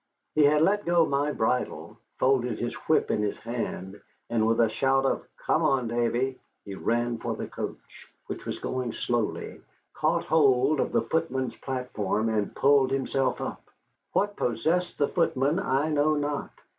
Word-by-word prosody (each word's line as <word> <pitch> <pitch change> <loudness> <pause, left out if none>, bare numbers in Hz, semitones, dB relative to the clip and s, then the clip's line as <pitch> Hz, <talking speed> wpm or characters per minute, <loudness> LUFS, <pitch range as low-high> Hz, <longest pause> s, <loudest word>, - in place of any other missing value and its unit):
He 150 -1 +5
had 150 +2 +4
let 205 +4 +2
go 170 -1 +4
my 145 0 0
bridle, 125 0 -1 0.2
folded 125 -4 +2
his 120 - -3
whip 160 - +3
in - - +1
his 105 -1 -1
hand, 105 -4 -5 0.3
and 110 -2 +2
with 115 0 +2
a 115 - +5
shout 135 +4 +1
of - - -1
"Come 155 - +1
on, 135 -6 +2
Davy," 120 +3 0 0.3
he 100 - -6
ran 120 +3 -1
for - - -3
the - - -4
coach, - - -8 0.2
which - - -7
was - - -3
going 130 -2 -3
slowly, 120 -3 -2 0.3
caught - - +1
hold 140 -2 +3
of - - 0
the - - +2
footman's 130 -6 -1
platform, 115 -5 -2
and 105 -2 -1
pulled 140 -1 +4
himself 135 0 0
up. - - -4 0.5
What 205 +1 +1
possessed 170 - 0
the 145 - +2
footman 160 -2 +1
I 150 -5 +1
know 150 +1 +3
not. 145 0 -2
135 Hz, 165 wpm, -27 LUFS, 120-150 Hz, 0.5 s, He